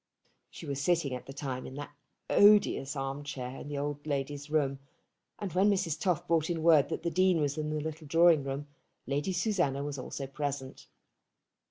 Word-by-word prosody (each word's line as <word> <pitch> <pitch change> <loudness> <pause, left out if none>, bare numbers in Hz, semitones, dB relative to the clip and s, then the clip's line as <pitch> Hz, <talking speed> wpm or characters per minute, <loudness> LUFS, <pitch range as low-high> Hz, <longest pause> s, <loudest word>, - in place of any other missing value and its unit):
She - - -10
was 140 -1 -3
sitting 160 -3 +1
at 125 - -6
the - - -7
time 135 -2 -4
in 130 - -9
that 145 0 -7 0.4
odious 205 -9 +5
arm 135 +1 -3
chair 130 -2 -6
in - - -8
the 145 -1 -4
old 145 +1 -4
lady's 145 0 -3
room; 140 -3 +1 0.6
and 200 -3 -5
when 190 +3 +4
Mrs. 185 -6 0
Toff 175 -2 0
brought 165 -1 +2
in 165 -2 -2
word 160 -4 +5
that - - -4
the 170 - -1
Dean 185 -1 +3
was 145 -2 0
in 155 -1 -3
the 155 0 -1
little 155 0 -6
drawing 165 -1 +5
room, 140 +1 -4 0.4
Lady 145 +7 -1
Susanna 175 -7 0
was 145 -1 -4
also 135 +1 -5
present. 135 -1 -5
145 Hz, 190 wpm, -30 LUFS, 140-170 Hz, 0.6 s, odious